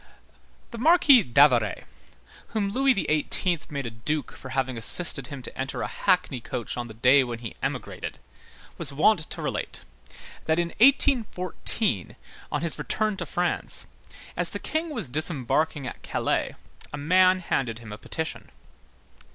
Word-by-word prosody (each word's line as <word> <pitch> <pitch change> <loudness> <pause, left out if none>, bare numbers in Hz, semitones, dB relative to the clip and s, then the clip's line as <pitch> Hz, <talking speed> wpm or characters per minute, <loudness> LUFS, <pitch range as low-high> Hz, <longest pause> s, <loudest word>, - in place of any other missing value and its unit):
The 235 - -7
Marquis 295 -3 +6
d'Avaray, 125 - +3 0.6
whom 210 -3 -1
Louis 270 +4 +3
XVIII. 170 0 +1
made 140 -2 -4
a 115 - -4
duke 145 +7 -3
for 130 - -11
having 130 -1 -1
assisted 135 +3 +2
him 135 -2 -8
to - - -8
enter 135 +1 -3
a - - -2
hackney 180 -9 0
coach 115 0 -5
on 120 -1 -4
the 110 - -11
day 125 +4 +5
when 120 -2 -5
he 115 -1 -7
emigrated, - - -4 0.6
was 155 -4 -3
wont 155 +4 +2
to - - -6
relate, - - -4 0.6
that 160 0 +1
in 170 -1 0
1814, 220 - +2 0.4
on 145 - -1
his 170 - 0
return 215 -1 -1
to - - -5
France, 175 0 -1 0.5
as - - +2
the - - -4
King 320 +1 -2
was 230 - -2
disembarking 150 +1 0
at 125 - -7
Calais, - - -1 0.4
a 145 - -5
man 185 +5 +4
handed 135 -10 -2
him 115 -3 -9
a - - -7
petition. 160 +5 -5
155 Hz, 150 wpm, -26 LUFS, 125-185 Hz, 0.6 s, Marquis